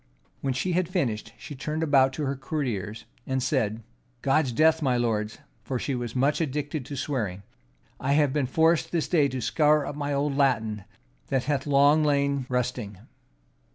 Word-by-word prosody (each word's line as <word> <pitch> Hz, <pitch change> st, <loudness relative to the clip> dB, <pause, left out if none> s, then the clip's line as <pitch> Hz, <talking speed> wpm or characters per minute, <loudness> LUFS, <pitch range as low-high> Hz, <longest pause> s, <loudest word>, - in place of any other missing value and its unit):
When 135 Hz, -2 st, -2 dB
she 180 Hz, +7 st, -1 dB
had 180 Hz, 0 st, 0 dB
finished, 125 Hz, -, -1 dB
she -, -, -9 dB
turned 150 Hz, +4 st, -3 dB
about 135 Hz, -4 st, +4 dB
to 150 Hz, +2 st, -3 dB
her 135 Hz, +1 st, -1 dB
courtiers, 125 Hz, -, -4 dB, 0.2 s
and 130 Hz, -1 st, 0 dB
said, 115 Hz, -5 st, 0 dB, 0.4 s
"God's 140 Hz, -1 st, +2 dB
death, 160 Hz, +5 st, +3 dB
my 130 Hz, -4 st, +2 dB
lords," 110 Hz, -3 st, -1 dB, 0.3 s
(for 125 Hz, +4 st, -2 dB
she 135 Hz, -, -2 dB
was 120 Hz, -2 st, -4 dB
much 140 Hz, +5 st, +2 dB
addicted 145 Hz, -2 st, -3 dB
to 140 Hz, -, -6 dB
swearing,) 110 Hz, -9 st, -3 dB, 0.6 s
"I 135 Hz, +1 st, 0 dB
have 145 Hz, -2 st, +3 dB
been 145 Hz, -4 st, 0 dB
forced 160 Hz, +4 st, +2 dB
this 165 Hz, -3 st, 0 dB
day 155 Hz, -5 st, +3 dB
to 130 Hz, -1 st, -4 dB
scour 150 Hz, +3 st, +3 dB
up 145 Hz, -, -5 dB
my 145 Hz, -1 st, -3 dB
old 140 Hz, 0 st, 0 dB
Latin, 110 Hz, -8 st, +1 dB, 0.4 s
that 130 Hz, -2 st, 0 dB
hath 145 Hz, 0 st, -1 dB
long 145 Hz, +2 st, +5 dB
lain 140 Hz, -2 st, +1 dB
rusting." 125 Hz, -5 st, -2 dB
140 Hz, 175 wpm, -26 LUFS, 125-150 Hz, 0.6 s, long